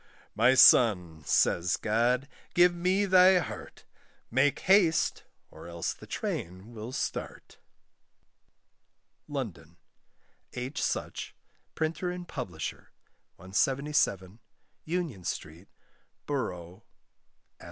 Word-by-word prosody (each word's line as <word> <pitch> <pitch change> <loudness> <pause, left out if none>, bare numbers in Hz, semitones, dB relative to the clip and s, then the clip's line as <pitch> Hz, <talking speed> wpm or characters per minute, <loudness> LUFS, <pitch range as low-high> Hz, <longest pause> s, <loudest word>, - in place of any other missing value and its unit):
"My 125 +4 +4
son," 90 -12 +5
says 85 +1 +2
God, 120 +5 +1 0.3
"give 175 0 +5
me 185 +3 +1
thy 185 0 +6
heart, 175 - -6 0.5
Make 135 +4 +2
haste, 185 -5 +3 0.3
or - - -12
else 85 -1 -3
the - - -15
train 95 +7 -5
will 110 +2 -7
start." - - -5 1.7
LONDON: - - -6 0.8
H. 125 +4 -4
Such, - - -3 0.4
Printer 160 +3 -2
and 180 0 -6
Publisher, 80 - -6 0.5
177, 100 - -1 0.5
Union 160 - -3
Street, 85 +3 -6 0.6
Boro'. 90 -11 -4
S.E. - - -35
125 Hz, 90 wpm, -29 LUFS, -, 1.7 s, thy